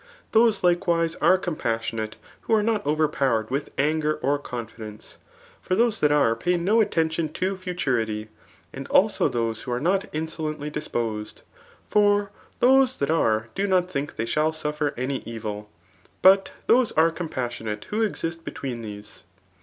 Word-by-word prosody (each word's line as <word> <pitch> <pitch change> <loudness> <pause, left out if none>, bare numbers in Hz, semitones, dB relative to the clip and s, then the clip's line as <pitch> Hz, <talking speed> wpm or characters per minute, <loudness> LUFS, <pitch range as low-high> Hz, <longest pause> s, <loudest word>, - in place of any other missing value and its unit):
Those 225 -3 +4
likewise 175 -2 +2
are 180 +4 +4
compassionate 115 -10 -3 0.3
who 225 - +1
are 215 - +2
not 215 -1 0
overpowered 140 -7 +1
with 140 +2 -2
anger 155 +2 +1
or 145 -1 0
confidence; 115 -5 -8 0.4
for 185 - -1
those 230 +1 +2
that 150 - +3
are 140 -6 +3
pay 175 +9 0
no 205 +7 +3
attention 160 -5 0
to 185 +3 -1
futurity. 125 - -2 0.4
And - - -7
also - - +3
those 115 -2 -2
who 125 - -6
are 120 - 0
not 190 +7 0
insolently 155 -1 -4
disposed; 115 -8 -4 0.4
for 205 -1 +3 0.3
those 260 0 +5
tbat 140 +2 0
are 110 -6 +1
do 200 +1 -1
not 185 -1 +2
think 145 -2 -3
they 115 - -2
shall 155 +7 +1
suffer 150 -2 -2
any 130 +2 -1
evil. 105 -2 -6 0.5
But 195 +1 +6 0.2
those 250 -1 +4
are 165 +1 +4
compas 130 -8 -4
donate 105 -1 -5
who 215 +2 0
exist 165 -6 -2
between 125 -4 -5
these. 105 -1 -9
155 Hz, 155 wpm, -25 LUFS, 115-185 Hz, 0.5 s, But